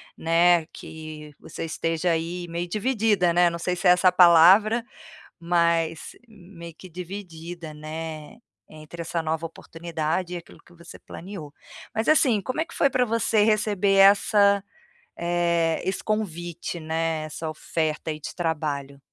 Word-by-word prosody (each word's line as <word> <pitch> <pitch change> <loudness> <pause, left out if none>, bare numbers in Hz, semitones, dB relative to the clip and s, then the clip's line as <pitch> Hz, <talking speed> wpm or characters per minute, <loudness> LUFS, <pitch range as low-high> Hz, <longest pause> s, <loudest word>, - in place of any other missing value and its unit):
né, 170 0 +3
que 155 -1 -10
você - - -7
esteja, 165 +2 -1
aí, 170 +2 -3
meio 170 +1 -4
dividida, 210 -4 +1
né, 175 0 +4
não 170 - -5
sei 180 +1 -2
se 180 +1 0
é - - +8
essa 180 +1 +5
a - - -4
palavra, 185 +6 +6 0.5
mas 170 -1 0 0.2
meio 175 -5 -12
que 185 +2 -13
dividida, 175 -2 -8
né, 155 +2 -7 0.3
entre 155 +2 -10
essa 165 0 -3
nova 160 +1 -2
oportunidade 165 +1 -4
e - - -3
aquilo 170 - -13
que 175 - -21
você 170 0 -13
planeo. 170 -6 -9 0.4
Mas 220 +4 0
assim, 255 -9 +4
como 255 +8 -4
é 325 - +1
que - - -13
foi 280 - +3
para 250 -1 +1
você 225 -1 +1
receber 210 -2 +1
essa 200 +1 +5 0.6
eh, 170 -1 0
esse 190 - -2
convite, 175 -5 -4
né, 160 0 -2
essa 155 +1 -5
oferta, 155 0 -3
aí, 155 - -5
de - - -8
trabalho? 145 -5 -3
170 Hz, 150 wpm, -24 LUFS, 160-195 Hz, 0.6 s, é